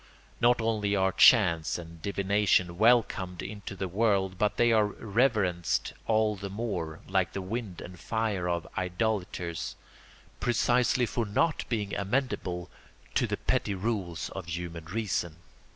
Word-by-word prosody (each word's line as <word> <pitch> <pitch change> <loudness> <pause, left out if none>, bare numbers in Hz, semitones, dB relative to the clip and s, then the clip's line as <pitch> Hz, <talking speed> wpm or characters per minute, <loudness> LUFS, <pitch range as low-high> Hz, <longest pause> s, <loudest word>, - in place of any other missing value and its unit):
Not 120 0 +4
only 105 -2 0
are 95 -1 +2
chance 85 -8 +5
and 85 -1 -10
divination 100 -2 +1
welcomed 110 -6 +2
into 100 -1 -7
the 95 0 -3
world 95 -1 +1
but 105 -1 +1
they 120 0 +4
are 110 -2 +4
reverenced 105 -5 0
all 110 -1 +2
the 100 0 -6
more, 95 -7 -4
like 95 -1 +1
the - - -3
wind 100 -3 -5
and 90 0 -10
fire 110 -6 -1
of 85 -1 -1
idolaters, 90 -3 -2 0.6
precisely 125 +1 +2
for 115 0 -2
not 155 +10 +1
being 105 -4 -2
amenable 100 -5 -2 0.4
to - - +2
the - - -2
petty 100 - 0
rules 95 -5 -2
of 95 -3 -7
human 85 -1 -5
reason. 90 -3 -2
100 Hz, 135 wpm, -29 LUFS, 90-110 Hz, 0.6 s, chance